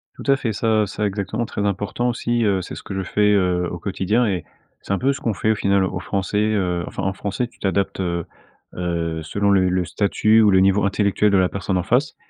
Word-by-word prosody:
Tout - - -10
à - - +6
fait, 125 -4 -2
ça 110 0 +1
ça 105 +2 -3
exactement 105 +3 -2
très 105 -2 -3
important 105 +5 -1
aussi, 120 0 -1
heu, 100 -3 +2
c'est 90 - -8
ce - - -8
que 100 - -6
je 95 - -2
fais, 105 +2 +2
heu, 90 -3 +1
au 85 - -4
quotidien, 100 +6 0
et 90 -6 -2 0.4
c'est - - -7
un - - +1
peu 135 +5 +1
ce - - -9
qu'on 115 - 0
fait 110 - +1
au - - +1
final 100 -2 +2
aux 95 -1 -2
Français, 95 +2 -2
heu, 95 -5 0
enfin - - -5
en 95 - 0
français, 100 +5 -3
tu 120 - -26
t'adaptes, 95 0 -1
heu 85 -2 -2 0.5
heu, 85 -2 -2
selon 100 +6 0
le 95 -2 +3
le 90 0 0
statut 105 +5 +2
ou 105 - +5
le 95 -1 +5
niveau 95 +1 +3
intellectuel 100 +1 +2
de 100 - +4
la 90 -1 +3
personne 95 -1 -2
en 90 - 0
face. 125 - +1
100 Hz, 245 wpm, -21 LUFS, 95-105 Hz, 0.5 s, à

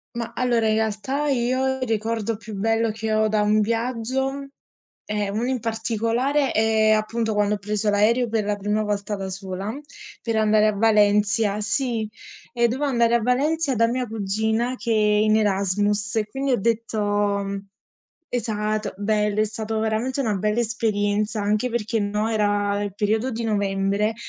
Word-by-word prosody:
Ma 235 -1 -4
allora, 240 -3 +1
in 215 - +3
realtà 220 +7 -1
io 260 +1 +1
il 255 - -1
ricordo 225 0 -1
più 210 0 -9
bello 225 +2 +1
che 220 0 -3
ho 215 0 +3
da 210 -1 +1
un 210 +1 +3
viaggio, 255 +5 -1 0.6
è 210 -1 -2
uno 215 +4 -2
in 255 -1 -1
particolare: 230 +5 0
é 220 0 +3
appunto 220 +1 -1
quando 210 0 +1
ho - - -4
preso 210 +1 -1
l'aereo 230 +4 +2
per 220 -1 0
la 205 0 -1
prima 210 +2 -1
volta 205 0 -2
da 195 -1 -5
sola 190 +2 -5 0.5
per 230 -1 -2
andare 215 0 +4
a 215 - +3
Valencia. 210 -1 +3
Sì, 230 0 -1 0.4
e 235 -1 +3
dovevo 265 +5 -1
andare 235 -2 +2
a 235 - +2
Valencia 275 +3 +1
da 230 - +4
mia 250 +1 -1
cugina 220 +3 -1
che 235 -2 -5
è - - +4
in 215 0 +3
Erasmus 205 0 +1
e 215 -1 +1
quindi 270 +4 -2
ho 240 - +1
detto 205 -3 0 0.8
esatto. 215 -3 -2
Bello 210 0 0
è - - +4
stato, 220 0 -3
veramente 225 +5 -1
una 220 -6 0
bella 210 +3 0
esperienza, 215 -1 0
anche 210 +4 0
perché 225 -1 -1
no, 210 +2 -1
era 205 -1 +1
il 205 - -3
periodo 215 +4 0
di 230 -1 -4
novembre 200 0 0
220 Hz, 165 wpm, -23 LUFS, 210-230 Hz, 0.8 s, andare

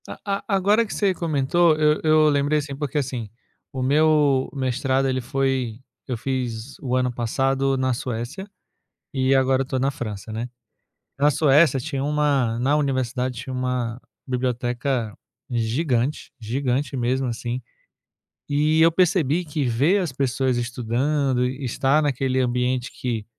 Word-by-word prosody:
A - - -7 0.3
a 200 - +1
agora 205 +4 +3
que 215 - -7
você 200 -2 +1
comentou, 165 0 +2
eu 150 0 +2
eu 155 -1 +5
lembrei 145 +1 +2
assim 140 -1 -5
porque 145 +1 -3
assim, 125 -6 -3 0.4
o 130 -1 -3
meu 145 -1 +3
mestrado 135 0 0
ele 130 0 0
foi 130 -3 -1 0.3
eu 125 -3 -2
fiz 125 -1 -4
o 125 -2 -1
ano 125 -1 +1
passado 135 +3 0
na 130 -1 +1
Suécia, 125 - -5 0.7
e 130 0 +2
agora 135 0 +3
eu - - -7
tô 130 -1 -2
na 135 +2 +1
França, 110 -6 -6
né. 115 +3 -4 0.7
Na 145 +1 +4
Suécia 145 0 +4
tinha 135 0 -3
uma 140 -5 +1
na 135 +5 +2
universidade, 130 -3 -1
tinha 125 +2 -6
uma 125 -2 -2 0.3
biblioteca 125 -2 -1 0.4
gigante, 120 +3 -1
gigante 130 +4 -1
mesmo, 130 +2 0
assim. 120 +2 -4 0.9
E 150 +2 +2
eu 165 +1 +6
percebi 175 -2 +2
que 150 -1 -2
ver 140 - +2
as 175 -6 -2
pessoas 130 -1 0
estudando 125 +3 0
e 130 +2 -4
estar 135 +4 +2
naquele 135 -2 0
ambiente 125 0 0
que, 115 -4 -4
130 Hz, 145 wpm, -23 LUFS, 125-145 Hz, 0.9 s, eu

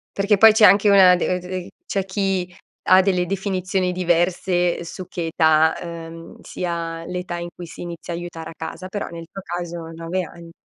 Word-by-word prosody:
Perché 200 +1 +3
poi 220 +2 +9
c'è 215 0 +6
anche 200 +2 +6
una 190 -2 +7
de 180 +1 -1
d 180 0 -6 0.2
c'è 195 - -1
chi 190 -2 -2 0.4
ha 185 +1 +8
delle 185 -2 +1
definizioni 190 -1 -1
diverse 175 0 +1
su 180 +2 -8
che 175 -2 -4
età, 160 -1 +4
uhm, 165 -1 -9
sia 165 -2 -4
l'età 180 0 -4
in 170 0 -5
cui 175 - -8
si 170 - -11
inizia 170 0 -7
a - - -3
aiutare 170 -2 -7
a - - -9
casa, 185 +3 -6
però 205 +1 -4
nel 165 -1 -8
tuo 195 - -8
caso 175 -1 -5 0.2
9 165 +3 -3
anni. 170 0 -12
180 Hz, 185 wpm, -21 LUFS, 170-185 Hz, 0.4 s, poi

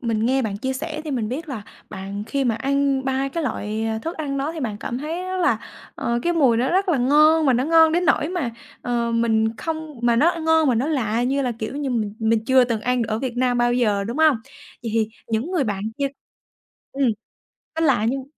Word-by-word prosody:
mình 225 -2 0
nghe 265 +1 +2
bạn 205 -3 -2
chia 260 +4 -2
sẻ 305 +3 -4
thì 305 - -4
mình 230 -5 -1
biết 300 +5 -5
là 230 -7 -5 0.3
bạn 200 +1 -6
khi 275 -1 -1
mà 235 -3 +2
ăn 275 +2 0
3 265 +1 0
cái 335 +3 -3
loại, 220 -4 -2
ờ, 220 0 -1
thức 330 +9 -5
ăn 280 -3 -3
đó 290 +4 -2
thì 320 - -6
bạn 215 -5 -3
cảm 245 - -3
thấy 325 +5 -4
rất 370 0 -3
là, 360 - +2 0.4
ờ, 235 0 -1
cái 345 - +1
mùi 265 -8 +3
nó 250 +3 +1
rất 380 +2 +1
là 315 -7 +2
ngon, 305 +4 +5
mà 260 - +5
nó 250 +2 +1
ngon 320 0 +5
đến 350 +1 +1
nỗi 305 -1 +2
mà, 350 -10 -2 0.3
ờ, 235 -1 -1
mình 225 -1 +1
không 315 -3 -5
mà 235 -1 +3
nó, 325 +8 +5
ơ, 335 - -5
ngon 320 -2 +3
mà 245 - +3
nó 245 +6 0
lạ 240 -6 0
như 275 +2 +1
là, 250 -2 -1
kiểu 220 +5 -4
như, 285 -3 -2
mình 215 -4 -1
mình 220 0 +1
chưa 260 0 +5
từng 230 -3 -2
ăn 250 +1 0
ở 215 0 -2
Việt 250 -2 -4
Nam 245 -1 +1
bao 240 0 +3
giờ, 210 -5 +1
đúng 235 +8 -4
hông? 310 -5 +5 0.5
Vậy 230 - -3
thì 220 -1 +2 0.2
những 225 +9 -1
người 340 -8 +1
bạn 205 -2 -2 0.2
kia 280 - +1 0.9
ừm, 275 -1 +1 0.7
nó 325 - +3
lạ 240 -6 +3
nhưng 265 0 -3
260 Hz, 245 wpm, -22 LUFS, 230-300 Hz, 0.9 s, ngon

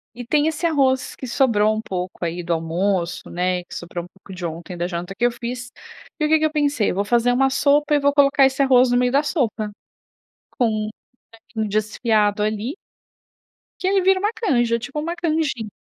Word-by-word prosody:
e 245 0 -7
tem 295 +5 +2
esse 320 +2 -2
arroz 270 -5 +1
que 260 - -7
sobrou 220 -4 +2
um 220 - -3
pouco 180 -3 -5
aí 170 +1 -3
do 170 0 -1
almoço, 170 +2 -1
né, 180 +1 0
e 175 - -11
que - - -11
sobrou 175 0 -6
um - - -14
pouco 190 +1 -14
de 180 -1 -6
ontem 170 +2 -6
da 175 +1 -1
janta 180 +1 -5
que 240 - +1
eu 245 - +3
fiz, 245 +1 -6 0.5
e 305 - +1
o 300 - 0
que 315 - +5
que 315 - +1
eu 310 - +1
pensei: 290 -7 +1
"Eu - - -4
vou 200 +1 0
fazer 240 +2 +2
uma 270 +2 +3
sopa 290 +2 +2
e - - +5
eu - - -2
vou 285 0 +3
colocar 280 -1 +5
esse 265 +1 +1
arroz 255 -2 +5
no 245 - +3
meio 250 0 +2
da 285 +2 +3
sopa, 230 -9 -1 0.9
com 245 - +3
um 215 -1 -2 0.6
franguinho 220 -1 -1
desfiado 215 0 +1
ali" 215 +6 -2 1.1
"que 370 - 0
aí 390 0 +3
vira 380 +1 +4
uma 415 +3 0
canja.", 240 - +1
tipo 275 +5 -5
uma 335 +3 -3
canjin 310 -10 -1
240 Hz, 220 wpm, -21 LUFS, 200-285 Hz, 1.1 s, que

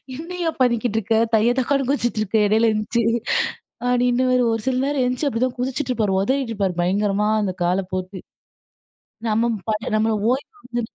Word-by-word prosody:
"என்னய்யா 335 +3 -3
பண்ணிக்கிட்ருக்க? 230 -3 +1 0.2
தைய 220 +2 +4
தக்கான்னு 275 +1 0
குதிச்சிட்ருக்க 225 -6 0
எடையில 220 +2 +3
எழுந்துருச்சு." 215 +2 0 0.8
அப்படீன்னுவாரு. 250 0 +2
ஒரு 225 - -2
சில 255 - +1
நேரம் 280 -2 0
எழுந்துச்சு 250 +4 0
அப்படிதான் 255 +1 -1
குதிச்சிட்டுப்பாரு. 245 -6 -1
ஒதறிட்டுருப்பார் 220 -7 -1
பயங்கரமா, 205 +3 +1
அந்த 190 -3 -1
கால 180 +3 +1
போட்டு. 185 +1 -4 1.1
நம்ம 230 +2 +2 0.2
பாட்டு 215 +1 -1
நம்பள 220 0 +1 0.2
ஓய்வு 275 +11 -3
வந்து 240 0 -3
235 Hz, 130 wpm, -22 LUFS, 210-255 Hz, 1.1 s, தைய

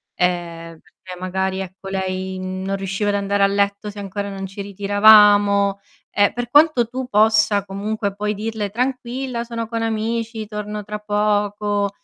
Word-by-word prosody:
Ehm, 170 -2 -2
perché 180 +2 -13
magari 190 +1 -2
ecco 190 +1 -8
lei 190 0 -3
non 185 +1 -3
riusciva 195 +2 -2
ad 205 - +1
andare 200 0 0
a - - +6
letto 200 +1 0
se 205 0 -9
ancora 200 +1 -4
non 195 -1 -6
ci 195 +2 -8
ritiravamo, 205 0 +5 0.3
e 205 0 +3
per 245 -1 -4
quanto 290 -4 +4
tu 255 +1 -4
possa 215 -2 +3
comunque 200 +1 -3
poi 210 +1 -1
dirle: 215 -1 -3
"Tranquilla, 250 +1 -3
sono 230 -1 -5
con 230 0 -3
amici, 225 0 -2
torno 210 0 -5
tra 210 0 -5
poco" 205 -1 0
205 Hz, 155 wpm, -20 LUFS, 195-220 Hz, 0.3 s, a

